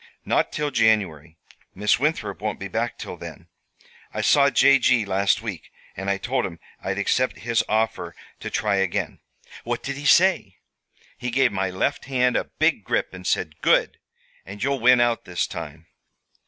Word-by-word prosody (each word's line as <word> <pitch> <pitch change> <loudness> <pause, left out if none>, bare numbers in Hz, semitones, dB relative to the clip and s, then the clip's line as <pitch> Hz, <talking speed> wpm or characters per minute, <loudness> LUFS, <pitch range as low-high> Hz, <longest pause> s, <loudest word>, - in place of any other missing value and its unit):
"Not - - +1
till 150 -1 -2
January. 95 - +1 0.4
Miss 105 +4 +2
Winthrop 150 +4 -1
won't - - -3
be - - -5
back - - -2
till - - -7
then. - - -10 0.6
I - - -3
saw 140 -1 +5
J. 140 0 +5
G. 125 -3 +3
last 100 +2 +1
week, 100 -7 -6 0.3
and 100 0 -4
I 100 - +1
told 125 +4 -1
him 85 -3 -5 0.2
I'd 95 +1 -2
accept 125 +5 0
his 115 +4 0
offer 110 +1 -1 0.2
to - - -5
try 100 -2 0
again." 95 -2 -1 0.4
"What 120 0 -3
did 140 0 -4
he 145 - -7
say?" 175 - +4 0.6
"He 125 - -3
gave 125 +1 +2
my 95 -1 -1
left 95 +10 -2
hand 125 -2 +1
a - - 0
big - - +2
grip - - -1
and 90 0 -8
said: 80 -3 -1
'Good! - - +2 0.4
and 100 +3 -8
you'll 140 0 0
win 125 +1 +5
out 120 -1 +1
this 90 -1 -1
time.'" 80 +3 -8
110 Hz, 175 wpm, -23 LUFS, 95-130 Hz, 0.6 s, saw